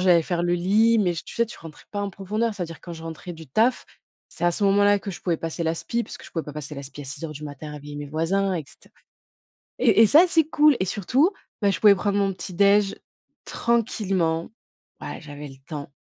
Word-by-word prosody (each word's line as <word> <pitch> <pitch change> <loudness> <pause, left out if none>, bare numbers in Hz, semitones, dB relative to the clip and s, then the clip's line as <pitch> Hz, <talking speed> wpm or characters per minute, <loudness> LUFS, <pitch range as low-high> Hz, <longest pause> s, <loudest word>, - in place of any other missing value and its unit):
j'allais 175 -3 +5
faire 175 +1 -2
le 175 0 +1
lit, 215 +6 +3
mais 180 -4 +2
je 165 - -5
tu - - -10
sais, 235 0 +2
tu 235 - -10
rentres 160 -2 -12
pas 205 -1 -3
en 200 - -3
profondeur. 215 +4 -2
C'est-à-dire 170 -4 -6
quand 175 - -8
je 160 0 -9
rentrais 165 +2 -7
du 160 -2 -11
taf, 225 - +1 0.4
c'est - - -5
à 175 - +5
ce 200 +4 +1
moment 200 +1 +4
là 205 0 +5
que 200 - -6
je 175 - -9
pouvais 170 -3 0
passer 165 +1 -3
l'aspi 165 +8 -1
parce - - -9
que - - -14
je - - -14
pouvais 165 - -2
pas 150 - -8
passer 150 0 -5
l'aspi 140 +1 -8
à - - -7
6:00 150 +4 -5
du 150 0 -8
matin, 150 +1 -8
réveiller 145 0 -9
mes 145 0 -5
voisins, 185 +6 0
et 165 -4 -3
cetera. - - -18 0.9
Et 225 -2 +5
et - - +8
ça, 315 - +7
c'est 320 -2 +4
cool. 300 -2 +4
Et 185 - 0
surtout, 250 - +2 0.3
bah, 200 - +4
je - - -3
pouvais 205 -2 +8
prendre 200 +2 0
mon 195 -1 +1
petit 185 0 -6
déj, 200 +1 +4 0.5
tranquillement. 195 -8 0 0.5
Bah, - - -6
j'avais 145 -1 -9
le 135 - -13
temps. 145 -4 -6
180 Hz, 240 wpm, -24 LUFS, 160-205 Hz, 0.9 s, et